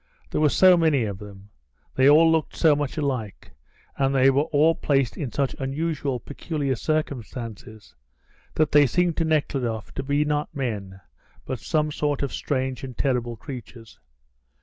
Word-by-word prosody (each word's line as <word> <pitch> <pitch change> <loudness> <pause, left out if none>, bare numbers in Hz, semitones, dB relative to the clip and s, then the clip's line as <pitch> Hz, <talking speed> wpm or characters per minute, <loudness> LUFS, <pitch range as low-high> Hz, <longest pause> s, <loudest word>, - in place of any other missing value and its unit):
There - - 0
were 150 - +5
so 185 +4 +6
many 155 -6 +2
of 100 -3 -4
them, 100 0 -12 0.4
they 130 +1 +4
all 160 +2 +6
looked 160 -1 0
so 155 -3 +4
much 145 0 -3
alike, 130 -9 -3 0.5
and 135 0 +1
they 135 0 +5
were 140 +3 +2
all 155 +3 +4
placed 135 -6 0
in 140 -7 -4
such 140 -2 -1
unusual, 140 -1 -2
peculiar 145 -1 -3
circumstances, 115 - -4 0.6
that 155 -1 +2
they 145 -2 +6
seemed 175 +4 +1
to 165 - +1
Nekhludoff 135 -8 -1
to - - -3
be 145 +2 0
not 150 +1 -2
men 105 -8 -4 0.5
but 130 - -4
some 155 -2 0
sort 145 -1 -1
of 140 - -3
strange 130 -1 -2
and 130 -3 -8
terrible 125 -3 -1
creatures. 120 -3 -10
140 Hz, 160 wpm, -24 LUFS, 125-150 Hz, 0.6 s, so